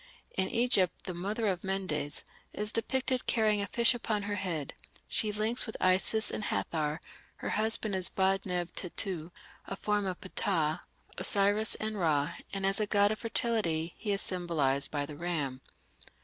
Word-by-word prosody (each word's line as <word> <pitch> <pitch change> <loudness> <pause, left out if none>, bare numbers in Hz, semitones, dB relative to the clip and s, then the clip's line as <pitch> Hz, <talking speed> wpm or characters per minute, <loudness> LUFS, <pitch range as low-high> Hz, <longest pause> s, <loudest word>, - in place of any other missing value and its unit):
In 190 0 0
Egypt 230 -7 +2
the 185 - -3
"Mother 205 +6 -2
of 185 -4 0
Mendes" 185 -7 -1 0.3
is 210 0 -2
depicted 255 +2 -1
carrying 215 -2 +3
a 200 - -2
fish 235 +3 +4
upon 220 -3 -1
her 205 0 -2
head; 170 -7 -2 0.3
she 215 - +1
links 220 +4 0
with 220 - -6
Isis 190 +4 +3
and 215 - -3
Hathor; 155 -1 -1 0.4
her - - -5
husband 220 -1 +1
is 185 -1 +2
Ba 190 0 +2
neb 180 -2 -2
Tettu, 180 -2 -1 0.4
a 195 - -3
form 205 0 0
of 185 -1 -3
Ptah, 165 -5 0 0.4
Osiris, 205 +2 +3
and 215 -1 -3
Ra, 150 -4 +2 0.2
and 195 -1 -2
as 195 +1 +5
a 210 - +1
god 205 0 +4
of 215 - -3
fertility 210 -9 0
he 210 - -3
is 200 - 0
symbolized 160 -7 0
by 145 -1 -1
the 150 0 -8
ram. 145 -6 -2
195 Hz, 165 wpm, -31 LUFS, 170-215 Hz, 0.4 s, as